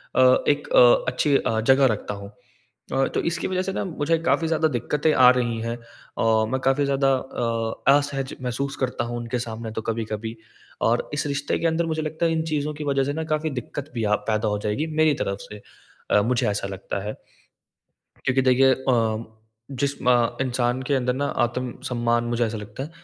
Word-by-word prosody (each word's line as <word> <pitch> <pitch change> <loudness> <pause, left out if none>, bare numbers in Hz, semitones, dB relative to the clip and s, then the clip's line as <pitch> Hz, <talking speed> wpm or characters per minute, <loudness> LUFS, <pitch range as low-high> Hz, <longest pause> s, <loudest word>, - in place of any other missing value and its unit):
अ, 130 0 +5
एक 145 0 +1
अ, 120 -1 +6
अच्छी 140 +2 +1
अ, 110 0 -1
जगह 135 +4 +5
रखता 105 0 -5
हूँ। 100 0 -9 0.6
अ, 135 0 +2
तो - - +1
इसकी 170 - -3
वजह 185 0 0
से 195 - -3
ना - - -2
मुझे 165 -2 0
काफ़ी 165 - +2
ज़्यादा 160 -1 +2
दिक्कतें 150 +4 0
आ 125 -1 +7
रही 120 -2 -1
हैं। 115 +1 -3
अ, 115 -1 -1
मैं 130 - 0
काफ़ी 135 +2 +3
ज़्यादा 135 -1 +2
अ, 115 0 0
असहज 140 -1 -2
महसूस 135 +3 -3
करता 125 -2 -1
हूँ 120 0 -4
उनके 120 +1 -3
सामने 115 -1 -5
तो 110 - -4
कभी-कभी। 110 0 -4 0.5
और 115 +1 +1
इस 145 0 -1
रिश्ते 140 0 -1
के 165 - 0
अंदर 165 +1 +1
मुझे 160 -1 -2
लगता 160 +2 -1
है 165 - +1
इन 160 0 0
चीज़ों 150 -1 -1
की 150 0 -6
वजह 135 -1 +1
से 145 - -1
ना 160 +1 -3
काफ़ी 155 +1 -1
दिक्कत 145 +5 -7
भी 115 -3 -1
अ, 105 - +3 0.2
पैदा 110 0 +1
हो 105 - -1
जाएगी 105 +9 -1 0.2
मेरी 155 -2 +4
तरफ 100 0 -2
से। 105 -1 -10 0.5
अ, 105 - +5
मुझे 120 +3 +1
ऐसा 100 -1 -2
लगता 95 0 -5
है। 105 - -3 1.1
क्योंकि 130 0 +2
देखिए 130 +1 +5
अ, 115 -4 0 0.5
जिस 140 +1 -2
म 120 -2 +3
इंसान 125 0 0
के 140 - 0
अंदर 125 -2 +1
ना 140 +2 -1 0.2
आत्मसम्मान 120 -1 -2
मुझे 120 0 0
ऐसा 110 0 -4
लगता 105 +5 -7
है 155 - -9
125 Hz, 200 wpm, -24 LUFS, 115-145 Hz, 1.1 s, आ